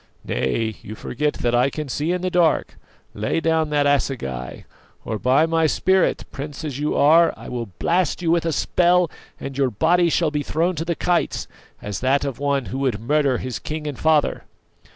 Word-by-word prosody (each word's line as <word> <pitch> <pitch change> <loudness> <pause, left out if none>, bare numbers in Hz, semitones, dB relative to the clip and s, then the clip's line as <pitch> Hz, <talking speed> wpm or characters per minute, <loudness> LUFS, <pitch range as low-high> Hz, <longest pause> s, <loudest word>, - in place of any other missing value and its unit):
Nay, 110 - -1
you 110 - -8
forget 150 +7 -2
that 120 -1 -1
I 125 +3 +3
can 150 +1 -5
see 150 +5 -1
in 180 0 -2
the 185 - -1
dark; 170 -4 +2 0.4
lay 105 +9 -1
down 160 -1 +1
that 145 -1 +1
assegai, 120 - -1 0.4
or, 110 -2 -3
by 135 +7 +3
my 165 -1 +2
spirit, 190 +4 +2
prince 145 +2 -7
as 140 -3 -4
you 150 +1 -1
are, 165 +4 +5
I - - -10
will 120 -2 -4
blast 175 -2 +1
you 170 -2 0
with 170 -1 +2
a - - +1
spell, 175 +2 +2 0.3
and 135 - -6
your 135 -1 +2
body 170 - +2
shall 165 -1 +1
be 150 -1 -1
thrown 165 +5 0
to 165 - -2
the 170 0 -1
kites, 175 +1 0 0.4
as 105 -1 -4
that 135 +3 +1
of 135 -3 -4
one 140 -2 0
who 135 - -2
would 130 -6 0
murder 140 +2 +1
his 125 0 -5
king 155 0 -5
and 145 -4 -5
father!" 155 -2 +2
150 Hz, 195 wpm, -22 LUFS, 130-165 Hz, 0.4 s, are